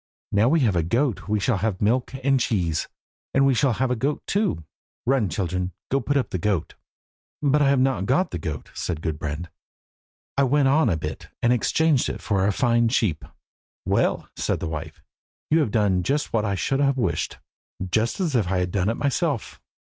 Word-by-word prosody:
Now 105 +4 +3
we 160 +1 +3
have 110 -8 +2
a 85 - +3
goat 115 - 0
we 105 0 +1
shall 105 +2 +1
have 100 -1 -1
milk 125 +5 +1
and 135 0 +3
cheese, 90 -9 0 0.5
and 135 0 +5
we 135 - +4
shall 130 0 +2
have 130 +4 0
the 125 - +1
goat 140 +5 -1
too. 200 - 0 0.4
Run, 125 -5 +2
children, 90 +2 -2 0.2
and 135 -1 +1
put 145 - +2
up 135 - -1
the 90 - -2
goat." 95 -4 -1 0.7
"But 145 +1 +3
I 140 - +4
have 140 -1 +3
not 130 -7 +1
got 150 +10 +2
the 90 - -3
goat," 75 -2 -5
said 80 -3 -4
Gudbrand. 75 +1 -4 0.8
"I 140 - +2
went 140 +1 +3
on 140 -2 +4
a 85 - +1
bit, - - -6 0.2
and 120 +1 +4
exchanged 150 +3 +2
it - - -5
for 100 -2 +1
a - - +3
fine 120 +2 +2
sheep." 110 - 0 0.6
"Well," - - +1
said - - -1
the - - -3
wife, 80 0 -6 0.5
"you 160 - +5
have 150 - +1
done 100 -4 +2
just 145 +11 -1
what 110 -1 +1
I 100 -1 0
should 135 +9 0
have 140 -1 +2
wished 125 - -1 0.5
just 110 - +1
as 170 -7 0
if 110 -6 +2
I 95 +1 0
had 90 -1 -1
done 95 +1 +1
it 115 - -1
myself. 140 -2 -1
115 Hz, 200 wpm, -24 LUFS, 90-135 Hz, 0.8 s, and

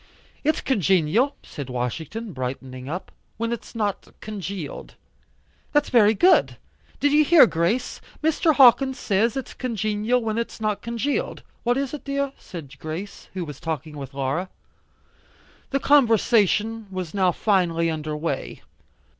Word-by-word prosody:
"It's 310 +1 +1
congenial," 195 - +2
said 140 -3 -8
Washington 160 - -4
brightening 130 0 -5
up, 180 +4 -5 0.3
"when 230 +1 -1
it's 235 - -8
not 210 -3 -2
congealed." 195 -6 -6 0.8
"That's 295 0 +2
very 220 -3 +5
good. 365 - +4 0.4
Did 290 - +3
you 300 +1 +5
hear, 320 -1 +8
Grace, 175 +5 -1 0.2
Mr. 320 0 +3
Hawkins 265 0 +6
says 220 +6 +1
it's 265 - -5
congenial 215 0 0
when 225 0 -1
it's 235 - -4
not 215 -2 -1
congealed." 235 +5 -2 0.2
"What 245 +1 +1
is, 275 -1 -1
dear?" 280 -1 -2
said 155 -7 -10
Grace, 165 +6 -7
who 180 -2 -3
was 150 -3 -9
talking 155 -1 -4
with 135 -1 -8
Laura. 140 +7 -2 1.2
The 275 - 0
conversation 225 -5 +3
was 185 -4 -5
now 190 -3 +3
finely 170 -4 +1
under 155 -1 -4
way. 150 -3 -4
210 Hz, 135 wpm, -24 LUFS, 165-245 Hz, 1.2 s, hear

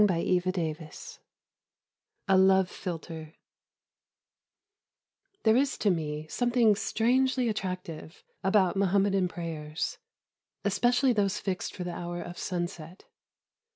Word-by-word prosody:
XXVI 175 -4 -1 1.1
A 195 - +5
LOVE 190 0 +5
PHILTRE 165 -2 -6 2.1
There 220 0 +5
is, 270 +2 +2
to 205 - +2
me, 155 -3 -2
something 240 +2 +3
strangely 250 +4 +1
attractive 180 -6 -5 0.2
about 190 -1 +3
Muhammadan 195 -1 +2
prayers, 160 -3 -4 0.7
especially 245 +5 +3
those 205 -2 +1
fixed 190 -3 -3
for 185 - -4
the 175 -1 -4
hour 175 0 -5
of 175 0 -7
sunset. 175 -1 -5
185 Hz, 95 wpm, -29 LUFS, 170-210 Hz, 2.1 s, A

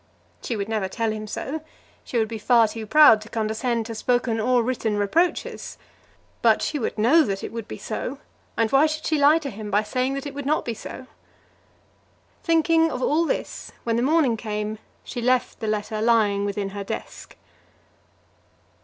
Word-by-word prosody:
She 235 - -3
would 200 -2 -3
never 215 -3 -1
tell 225 +3 -2
him 215 0 -5
so. 290 +8 -4 0.4
She 245 - -3
would 220 -1 +2
be 225 0 -6
far 230 +1 +4
too 220 0 -7
proud 260 -5 +7
to 215 - -11
condescend 225 +1 -1
to 225 - -6
spoken 240 0 0
or 245 +2 +2
written 225 -3 -1
reproaches. 325 - -1 0.6
But - - +4
she 300 - -1
would 230 - -3
know 250 +10 +5
that 195 -9 -2
it - - -5
would 230 -2 -6
be - - -7
so, 245 +5 -5 0.4
and 225 -1 +1
why 275 +3 +5
should 310 0 -4
she 310 -2 +1
lie 290 +3 +6
to 290 -5 -5
him 210 0 -7
by 205 +2 +2
saying 255 +4 -1
that 275 - -5
it 285 - -6
would 285 -1 -5
not 305 +2 +1
be 235 - -2
so? 255 - -9 1.4
Thinking 325 0 +3
of 255 0 -3
all 320 +3 +2
this, - - -4
when 230 -1 0
the 235 - +1
morning 275 -4 +2
came, 210 -1 -4 0.2
she 240 - -6
left 250 +1 +1
the 220 - -4
letter 215 0 -2
lying 215 -3 +3
within 200 -1 -2
her 200 0 -6
desk. - - -7
230 Hz, 190 wpm, -24 LUFS, 215-275 Hz, 1.4 s, proud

